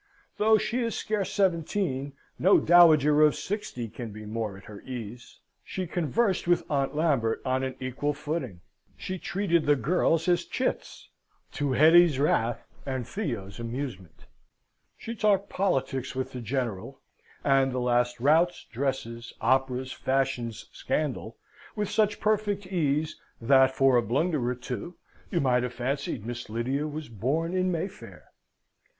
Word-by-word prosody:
Though 220 Hz, +1 st, +5 dB
she 235 Hz, +3 st, -1 dB
is 230 Hz, -3 st, -1 dB
scarce 210 Hz, -3 st, -2 dB
seventeen, 165 Hz, -6 st, 0 dB, 0.3 s
no 190 Hz, +4 st, +5 dB
dowager 155 Hz, -4 st, +6 dB
of 150 Hz, -1 st, +5 dB
sixty 205 Hz, -, -4 dB
can 115 Hz, +1 st, -7 dB
be 105 Hz, +1 st, -9 dB
more 110 Hz, -2 st, -4 dB
at 100 Hz, -, -14 dB
her 105 Hz, -1 st, -11 dB
ease. 120 Hz, -1 st, -8 dB, 0.2 s
She 185 Hz, -, -4 dB
conversed 180 Hz, +4 st, 0 dB
with 175 Hz, 0 st, +3 dB
Aunt 140 Hz, 0 st, 0 dB
Lambert 140 Hz, -8 st, +1 dB
on 130 Hz, 0 st, +1 dB
an 130 Hz, 0 st, -3 dB
equal 130 Hz, +3 st, -2 dB
footing; 140 Hz, -, -4 dB, 0.4 s
she 185 Hz, 0 st, -5 dB
treated 170 Hz, -4 st, 0 dB
the 145 Hz, -, +5 dB
girls 165 Hz, +2 st, +1 dB
as 175 Hz, -1 st, +2 dB
chits -, -, -3 dB, 0.4 s
to 145 Hz, -2 st, -1 dB
Hetty's 160 Hz, +1 st, +6 dB
wrath 120 Hz, -5 st, +1 dB, 0.2 s
and 130 Hz, -3 st, -4 dB
Theo's 115 Hz, -, -4 dB
amusement. 115 Hz, -, -6 dB, 0.7 s
She 230 Hz, -, -6 dB
talked 205 Hz, -3 st, +1 dB
politics 135 Hz, -9 st, -1 dB
with 130 Hz, 0 st, -3 dB
the 125 Hz, -, -6 dB
General, 115 Hz, -5 st, -3 dB, 0.4 s
and 135 Hz, -1 st, +3 dB
the 130 Hz, -, -3 dB
last 120 Hz, -1 st, +1 dB
routs, 160 Hz, +7 st, +3 dB
dresses, 120 Hz, -2 st, -3 dB
operas, 130 Hz, +1 st, +1 dB
fashions, 130 Hz, -5 st, -2 dB
scandal, 130 Hz, -7 st, -3 dB, 0.4 s
with 210 Hz, -2 st, -2 dB
such 210 Hz, -1 st, +1 dB
perfect 210 Hz, -2 st, 0 dB
ease 155 Hz, -4 st, -1 dB, 0.2 s
that, 130 Hz, +2 st, +5 dB
but 130 Hz, -, -11 dB
for 135 Hz, -2 st, +4 dB
a -, -, +4 dB
blunder 135 Hz, -, 0 dB
or 125 Hz, -, -1 dB
two, 125 Hz, +7 st, -6 dB, 0.3 s
you 175 Hz, -, 0 dB
might 125 Hz, -3 st, +2 dB
have 125 Hz, 0 st, -3 dB
fancied 130 Hz, -3 st, -3 dB
Miss 120 Hz, -1 st, -6 dB
Lydia 130 Hz, +7 st, -1 dB
was 150 Hz, 0 st, -6 dB
born 140 Hz, -, -1 dB
in 185 Hz, 0 st, +1 dB
Mayfair. 185 Hz, +4 st, -6 dB
135 Hz, 145 wpm, -27 LUFS, 125-175 Hz, 0.7 s, dowager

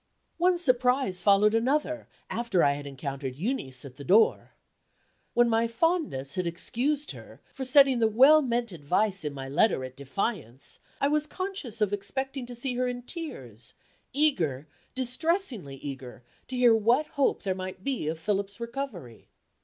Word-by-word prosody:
One 355 Hz, +1 st, +3 dB
surprise 250 Hz, -, +2 dB
followed 205 Hz, +2 st, +4 dB
another, 290 Hz, +6 st, 0 dB, 0.2 s
after 230 Hz, -6 st, 0 dB
I 140 Hz, -, +5 dB
had 145 Hz, 0 st, -5 dB
encountered 135 Hz, -1 st, -5 dB
Euneece 150 Hz, -, -2 dB
at 130 Hz, -2 st, -11 dB
the 140 Hz, -, -8 dB
door. 205 Hz, +9 st, +3 dB, 0.8 s
When 240 Hz, 0 st, +5 dB
my 230 Hz, 0 st, +2 dB
fondness 230 Hz, -, -1 dB
had 185 Hz, -1 st, -2 dB
excused 270 Hz, -, -2 dB
her -, -, -12 dB
for 270 Hz, -, -5 dB
setting 270 Hz, -1 st, +6 dB
the 225 Hz, -, +4 dB
well 270 Hz, +8 st, +6 dB
meant 240 Hz, -4 st, -1 dB
advice 185 Hz, +5 st, 0 dB
in 150 Hz, -, -2 dB
my 135 Hz, -1 st, -7 dB
letter 140 Hz, +1 st, +2 dB
at 130 Hz, 0 st, -10 dB
defiance, 140 Hz, -, -4 dB, 0.2 s
I 280 Hz, -, +2 dB
was 300 Hz, +1 st, +1 dB
conscious 370 Hz, -, -5 dB
of 205 Hz, -1 st, +2 dB
expecting 265 Hz, +6 st, -4 dB
to 245 Hz, -, -8 dB
see 250 Hz, +2 st, -3 dB
her 255 Hz, 0 st, +1 dB
in 245 Hz, 0 st, -4 dB
tears; 185 Hz, -, -7 dB, 0.4 s
eager, 175 Hz, -, +1 dB, 0.3 s
distressingly 255 Hz, -, -1 dB
eager, 135 Hz, -3 st, -8 dB, 0.2 s
to 260 Hz, -, -6 dB
hear 245 Hz, -2 st, +5 dB
what 235 Hz, +7 st, +3 dB
hope 280 Hz, -2 st, 0 dB
there 195 Hz, -3 st, 0 dB
might 185 Hz, 0 st, -7 dB
be 260 Hz, -, -2 dB
of 160 Hz, +1 st, -2 dB
Philip's 200 Hz, +3 st, -2 dB
recovery. 235 Hz, -, -6 dB
225 Hz, 160 wpm, -28 LUFS, -, 0.8 s, setting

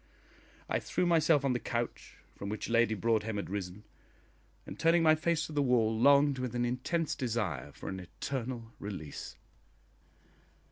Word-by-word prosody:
I -, -, 0 dB
threw 180 Hz, -, -1 dB
myself 160 Hz, -4 st, +4 dB
on 135 Hz, -, +2 dB
the 125 Hz, -, -1 dB
couch 120 Hz, 0 st, -4 dB, 0.2 s
from 100 Hz, -, -6 dB
which 105 Hz, +2 st, -4 dB
Lady 115 Hz, -1 st, +3 dB
Broadhem 110 Hz, +1 st, 0 dB
had 100 Hz, -2 st, -4 dB
risen, 100 Hz, 0 st, -5 dB, 0.8 s
and, -, -, -9 dB
turning 165 Hz, +1 st, +4 dB
my 155 Hz, -1 st, +7 dB
face 160 Hz, 0 st, 0 dB
to -, -, -9 dB
the 145 Hz, -, +2 dB
wall, 120 Hz, -4 st, +3 dB
longed 140 Hz, +3 st, +5 dB
with 125 Hz, -2 st, -3 dB
an 120 Hz, 0 st, +1 dB
intense 135 Hz, +7 st, -1 dB
desire 100 Hz, -, -2 dB
for -, -, -10 dB
an 95 Hz, -, -4 dB
eternal 120 Hz, +4 st, -5 dB
release. 95 Hz, -8 st, -7 dB
120 Hz, 155 wpm, -31 LUFS, 105-145 Hz, 0.8 s, my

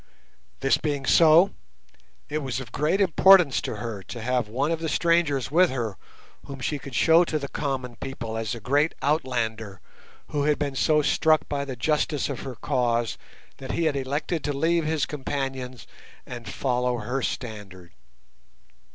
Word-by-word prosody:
This 135 Hz, -, +3 dB
being 145 Hz, -3 st, -2 dB
so, 165 Hz, +6 st, +6 dB, 0.8 s
it 150 Hz, +1 st, -2 dB
was 135 Hz, -3 st, -3 dB
of 125 Hz, -4 st, -9 dB
great 155 Hz, -, 0 dB
importance 190 Hz, -4 st, +5 dB
to -, -, -4 dB
her 115 Hz, -4 st, -5 dB
to 120 Hz, -, -8 dB
have 125 Hz, -2 st, 0 dB
one 135 Hz, +8 st, -1 dB
of 165 Hz, -, -1 dB
the 160 Hz, -1 st, -3 dB
strangers 165 Hz, -6 st, +1 dB
with 180 Hz, +3 st, +5 dB
her 115 Hz, -6 st, -3 dB, 0.5 s
whom 140 Hz, -1 st, -8 dB
she 145 Hz, +3 st, -2 dB
could 135 Hz, -2 st, -9 dB
show 165 Hz, +9 st, +5 dB
to 155 Hz, -, -1 dB
the 140 Hz, -2 st, -4 dB
common 130 Hz, -5 st, -4 dB
people 115 Hz, -4 st, -6 dB
as 110 Hz, +1 st, -3 dB
a -, -, -7 dB
great 145 Hz, +8 st, +1 dB
Outlander, 115 Hz, -, -1 dB, 0.5 s
who 145 Hz, -1 st, -1 dB
had 150 Hz, -1 st, +2 dB
been 145 Hz, -2 st, -2 dB
so 150 Hz, +2 st, +3 dB
struck 155 Hz, +2 st, +2 dB
by 140 Hz, -1 st, -2 dB
the 135 Hz, -2 st, -5 dB
justice 150 Hz, +3 st, 0 dB
of 140 Hz, -, -4 dB
her 130 Hz, -2 st, -7 dB
cause 120 Hz, 0 st, -1 dB, 0.4 s
that 130 Hz, -, -6 dB
he 170 Hz, -, 0 dB
had 155 Hz, -3 st, +1 dB
elected 140 Hz, +4 st, -2 dB
to 145 Hz, -, -1 dB
leave 165 Hz, +3 st, +1 dB
his 155 Hz, -1 st, 0 dB
companions 135 Hz, -4 st, -4 dB, 0.4 s
and 120 Hz, -4 st, -8 dB
follow 125 Hz, +1 st, -1 dB
her 125 Hz, +3 st, -3 dB
standard. 100 Hz, -9 st, -6 dB
135 Hz, 170 wpm, -25 LUFS, 120-150 Hz, 0.8 s, so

